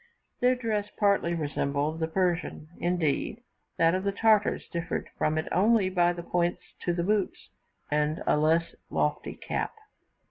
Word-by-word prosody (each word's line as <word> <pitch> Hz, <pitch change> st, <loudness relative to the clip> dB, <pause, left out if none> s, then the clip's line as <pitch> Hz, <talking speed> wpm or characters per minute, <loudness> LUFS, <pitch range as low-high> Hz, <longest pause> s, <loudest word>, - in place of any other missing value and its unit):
Their 250 Hz, +1 st, +4 dB
dress 215 Hz, -4 st, -2 dB
partly 200 Hz, -5 st, +2 dB
resembled 145 Hz, 0 st, -1 dB
the 160 Hz, -, 0 dB
Persian; 175 Hz, -3 st, -1 dB
indeed 175 Hz, -, 0 dB, 0.3 s
that 165 Hz, 0 st, +4 dB
of 185 Hz, 0 st, 0 dB
the 200 Hz, -, +1 dB
Tartars 215 Hz, 0 st, +2 dB
differed 170 Hz, 0 st, -3 dB
from 155 Hz, +1 st, 0 dB
it 155 Hz, -, -1 dB
only 205 Hz, -1 st, +3 dB
by 175 Hz, -1 st, +3 dB
points 175 Hz, 0 st, -1 dB, 0.2 s
to 175 Hz, -, +2 dB
the 170 Hz, 0 st, -1 dB
boots, 205 Hz, +1 st, -1 dB, 0.4 s
and 150 Hz, +1 st, 0 dB
a -, -, +3 dB
less 160 Hz, +2 st, +2 dB, 0.2 s
lofty -, -, -1 dB
cap. -, -, -3 dB
175 Hz, 145 wpm, -28 LUFS, 160-200 Hz, 0.4 s, Their